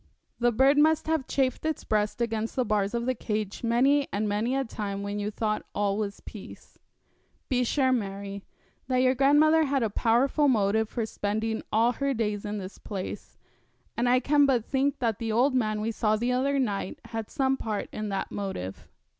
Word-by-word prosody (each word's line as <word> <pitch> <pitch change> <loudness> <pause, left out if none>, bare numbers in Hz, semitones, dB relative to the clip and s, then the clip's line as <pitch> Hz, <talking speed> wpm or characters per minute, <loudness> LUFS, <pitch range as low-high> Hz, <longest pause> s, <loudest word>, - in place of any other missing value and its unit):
The 240 0 +3
bird 270 +5 +4
must 315 +1 +4
have 315 -5 0
chafed 260 -2 0
its 315 0 -2
breast 210 +2 0
against 225 -1 -2
the 255 - +1
bars 210 -1 0
of 235 0 -1
the 255 - +1
cage 215 -3 -4
many 270 +5 +3
and 210 +2 -1
many 215 +5 0
a 270 0 0
time 200 -3 -4
when 205 +1 -3
you 205 0 -2
thought 215 0 -1
that - - -28
all 200 -1 +1
was 205 -1 -4
peace. 210 - -12 0.7
Be 250 -2 +2
sure, 260 +1 +2
Mary, 200 -3 -3 0.4
that 255 0 +2
your 255 0 +4
grandmother 300 +4 +4
had 275 -3 0
a 220 - -1
powerful 255 +7 +2
motive 220 -2 +2
for 230 -3 -2
spending 220 +1 -2
all 230 +3 +3
her 275 +2 -1
days 210 -3 -2
in 210 0 -3
this 190 -1 -8
place, 195 -1 -6 0.6
and 240 +2 +1
I 250 +1 +5
can 285 +1 +3
but 245 -5 +1
think 275 0 0
that 230 -5 -1
the 225 -1 -2
old 250 +5 +3
man 215 -4 0
we 225 +2 -1
saw 215 -1 +1
the 240 +3 0
other 270 +3 +1
night 205 -8 -2
had 225 -2 -5
some 270 -2 +1
part 215 -5 -3
in 215 -1 -4
that 195 -1 -3
motive. 190 - -5
230 Hz, 195 wpm, -27 LUFS, 210-265 Hz, 0.7 s, I